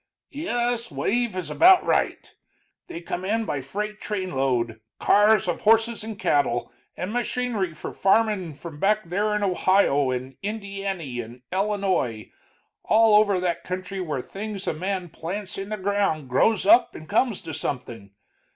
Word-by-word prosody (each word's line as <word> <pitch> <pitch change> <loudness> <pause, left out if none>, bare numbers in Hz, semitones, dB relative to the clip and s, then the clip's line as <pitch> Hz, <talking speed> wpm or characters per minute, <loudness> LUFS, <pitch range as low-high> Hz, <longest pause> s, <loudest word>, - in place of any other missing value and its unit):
"Yes, 245 -6 -2
wave 235 -1 -1
is 185 - -4
about 360 +2 +6
right. - - 0 0.5
They 170 - -7
come 175 +1 -4
in 220 +4 0
by 145 -8 -2
freight 210 +10 -5
trainload, 135 - -1 0.2
cars 210 -1 +4
of 175 - -2
horses 225 +1 +3
and 220 -2 -6
cattle, 120 -8 +1 0.3
and 185 +4 -4
machinery 240 -7 -1
for - - -7
farmin', 195 -5 +1
from 150 0 -10
back 210 -1 +1
there 210 +4 0
in 210 - -1
Ohio 185 -7 +3
and 130 +1 -4
Indiany 195 - -4
and 120 +3 -13
Ellinoi 190 - -1 0.5
all 220 0 +4
over 205 -3 +2
that 175 -2 -1
country 185 +1 -5
where 150 -7 -3
things 205 -1 -6
a - - 0
man 185 +2 -3
plants 185 +5 -6
in 195 +1 -5
the 215 - -3
ground 190 -8 0
grows 215 - +2
up 345 +4 +5
and 155 - -10
comes 225 0 +1
to 160 - -7
something. 125 -8 -5
195 Hz, 150 wpm, -24 LUFS, 155-215 Hz, 0.5 s, about